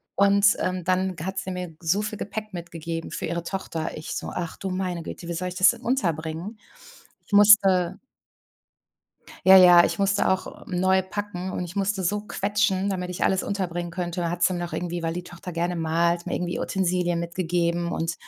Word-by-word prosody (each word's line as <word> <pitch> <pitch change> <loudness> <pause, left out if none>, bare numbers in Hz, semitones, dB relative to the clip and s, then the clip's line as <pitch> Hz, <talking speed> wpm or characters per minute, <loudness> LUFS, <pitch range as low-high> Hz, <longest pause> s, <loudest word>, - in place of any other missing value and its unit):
Und, 200 0 +5
ähm, 185 -1 -2
dann 185 +1 0
g 160 - -7
hat 190 +1 -3
sie 190 0 -5
mir 180 -3 -6
so 180 +4 +1
viel 210 0 -4
Gepäck 215 +1 -6
mitgegeben 165 -1 -6
für - - -4
ihre 170 +1 -3
Tochter. 170 -3 -4
Ich 155 - -6
so: - - -4
„Ach, 170 -2 -4
du 195 - -4
meine 185 -2 -3
Güte! 170 - -8
Wie 170 - -3
soll 180 +2 -3
ich 180 - -9
das 185 0 +6
denn 235 -1 -11
unterbringen?“ 175 - -2 0.7
Ich - - -14
musste 195 -3 +6 1.5
Ja, 190 0 +10
ja, 180 -2 +9
ich - - -1
musste 200 0 +2
auch 190 0 -2
neu 190 +1 +2
packen. 190 -1 -5
Und 180 - -3
ich 175 0 -9
musste 195 -1 -1
so 205 +4 0
quetschen, 205 -1 0
damit 180 -2 -3
ich 180 - -2
alles 190 -1 +2
unterbringen 175 -3 -3
könnte. 175 -1 -3
Hat 175 0 0
sie - - +3
noch 175 -1 -4
irgendwie, 175 -1 -3
weil 165 0 -2
die 180 0 -5
Tochter 175 +1 -9
gerne 175 +1 -1
malt, 170 +1 0
mir - - -2
irgendwie 175 0 -2
Utensilien 180 -2 0
mitgegeben 170 0 -1
und 165 0 -2
180 Hz, 195 wpm, -25 LUFS, 170-190 Hz, 1.5 s, Ja